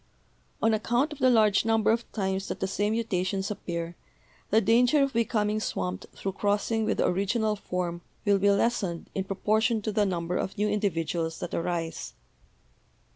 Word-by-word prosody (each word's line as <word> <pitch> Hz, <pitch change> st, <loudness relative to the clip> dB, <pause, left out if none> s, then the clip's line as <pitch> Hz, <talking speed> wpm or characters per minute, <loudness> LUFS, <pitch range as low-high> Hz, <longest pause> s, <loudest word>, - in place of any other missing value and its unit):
On 225 Hz, 0 st, +4 dB
account 240 Hz, +7 st, +1 dB
of 295 Hz, -, -12 dB
the 260 Hz, -, +5 dB
large 215 Hz, -4 st, +4 dB
number 225 Hz, -1 st, +3 dB
of 230 Hz, +1 st, -1 dB
times 190 Hz, -2 st, -2 dB
that -, -, -4 dB
the -, -, 0 dB
same 205 Hz, +2 st, 0 dB
mutations 195 Hz, -3 st, -1 dB
appear, 170 Hz, -4 st, -4 dB, 0.5 s
the 220 Hz, -, +5 dB
danger 240 Hz, +7 st, +4 dB
of 275 Hz, -, -1 dB
becoming 215 Hz, -2 st, +1 dB
swamped 90 Hz, -, -3 dB
through 195 Hz, -, -3 dB
crossing 205 Hz, +3 st, 0 dB
with -, -, 0 dB
the -, -, +2 dB
original 210 Hz, +4 st, +1 dB
form 180 Hz, -3 st, -3 dB, 0.2 s
will 200 Hz, -1 st, +4 dB
be 200 Hz, +1 st, +4 dB
lessened 200 Hz, -4 st, 0 dB
in 190 Hz, -, -2 dB
proportion 220 Hz, +4 st, +1 dB
to 215 Hz, -, -1 dB
the 205 Hz, -1 st, +2 dB
number 175 Hz, -1 st, -2 dB
of 190 Hz, -, -3 dB
new 210 Hz, +1 st, +1 dB
individuals 170 Hz, -5 st, -1 dB
that -, -, -5 dB
arise. 165 Hz, -1 st, -3 dB
205 Hz, 170 wpm, -27 LUFS, 180-225 Hz, 0.5 s, the